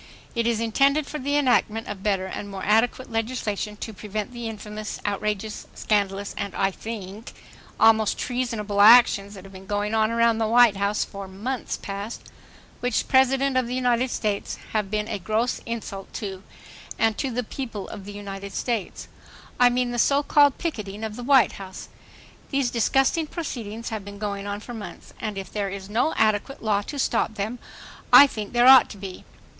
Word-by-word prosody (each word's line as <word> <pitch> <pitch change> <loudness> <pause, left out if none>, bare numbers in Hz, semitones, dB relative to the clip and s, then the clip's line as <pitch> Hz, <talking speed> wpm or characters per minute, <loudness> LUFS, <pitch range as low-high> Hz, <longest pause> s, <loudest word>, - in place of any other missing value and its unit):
It 235 -1 0
is 230 -2 +1
intended 275 +6 +2
for 300 - -6
the 285 +2 0
enactment 235 -5 +2
of 205 -2 -6
better 195 -2 0
and 200 +2 -6
more 195 -1 -6
adequate 230 +4 +2
legislation 225 -2 -2
to 220 - -6
prevent 210 +2 -5
the 235 -1 -5
infamous, 215 -1 -6
outrageous, 210 +1 -3
scandalous, 200 -1 -1
and, 200 -1 -4
I 195 0 +1
think, 210 0 -8 0.5
almost 220 -1 +4
treasonable 230 -5 -1
actions 210 -2 +6
that 190 - -11
have 195 0 -13
been 190 0 -12
going 205 +1 -1
on 220 -1 +3
around 230 -1 +2
the 220 - +1
White 235 -2 +5
House 200 +1 0
for 195 -1 -8
months 215 +7 -4
past, 200 +3 -6 0.6
which 245 -2 -1
President 265 0 +3
of 255 -2 +2
the 250 - -3
United 250 0 +1
States 210 -4 -2 0.2
have 210 -3 0
been 210 0 -1
a - - -3
gross 220 +5 -1
insult 210 -4 -6
to 195 -4 -5
the - - -18 0.6
and 225 -1 +2
to 270 - -1
the 250 0 -2
people 225 -4 -6
of 195 - -9
the 205 - -7
United 200 -1 -7
States; 230 -6 -3 0.5
I 245 0 +7
mean 245 0 0
the 240 - -2
so 280 +4 +3
called 285 -2 +4
picketing 215 - -4
of 220 -1 -4
the 245 - -7
White 265 -1 +5
House... 190 -1 -9 0.6
These 275 -3 0
disgusting 270 +7 +2
proceedings 230 - -5
have 220 -3 -5
been 200 0 -9
going 200 -1 -4
on 205 +1 -4
for 240 - -8
months, 220 -3 -9
and 215 -3 -4
if 195 -2 -6
there 205 -2 -1
is 195 +1 -7
no 245 +9 +1
adequate 215 +5 +1
law 205 -2 +2
to 285 +8 -7
stop 230 -4 0
them, 215 +5 -3 0.5
I 285 - +11
think 215 -7 -5
there 240 0 +4
ought 265 0 +9
to 205 - -9
be. 190 -2 -8
220 Hz, 185 wpm, -24 LUFS, 200-245 Hz, 0.6 s, I